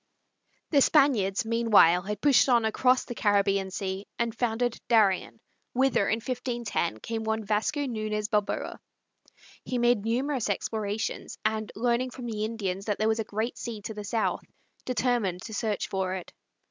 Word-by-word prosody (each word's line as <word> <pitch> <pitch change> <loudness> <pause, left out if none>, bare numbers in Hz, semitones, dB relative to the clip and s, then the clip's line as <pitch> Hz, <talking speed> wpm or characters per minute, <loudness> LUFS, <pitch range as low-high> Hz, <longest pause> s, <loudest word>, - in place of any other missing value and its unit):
The 285 -3 +5
Spaniards, 250 -9 +3
meanwhile, 220 -7 +5
had 210 +2 -5
pushed 280 -2 +5
on 235 -2 +4
across 255 +3 +3
the - - -5
Caribbean 200 -3 +2
Sea 190 +1 -4
and 235 -1 -1
founded 240 0 -1
Darien, 215 -2 +2 0.3
whither, 260 -5 +2
in - - +3
1510, 235 - -2
came 225 -1 -3
one 220 0 -1
Vasco 215 +8 0
Nuñez 215 -5 -2
Balboa. 210 -1 -1 0.8
He 255 - -3
made 240 -3 +3
numerous 250 +1 -1
explorations, 210 +1 -3
and, 215 -1 -1
learning 240 +3 +1
from 250 0 -8
the 215 -2 -3
Indians 200 -4 -3
that 210 -2 -1
there 215 - +1
was 220 0 +1
a - - 0
great 220 +3 -3
sea 230 -3 -5
to 220 - -5
the 210 -1 -7
south, 220 +2 -1 0.4
determined 240 -8 0
to 220 - -8
search 210 0 -1
for 190 -1 -2
it. 185 - -8
220 Hz, 160 wpm, -28 LUFS, 205-240 Hz, 0.8 s, The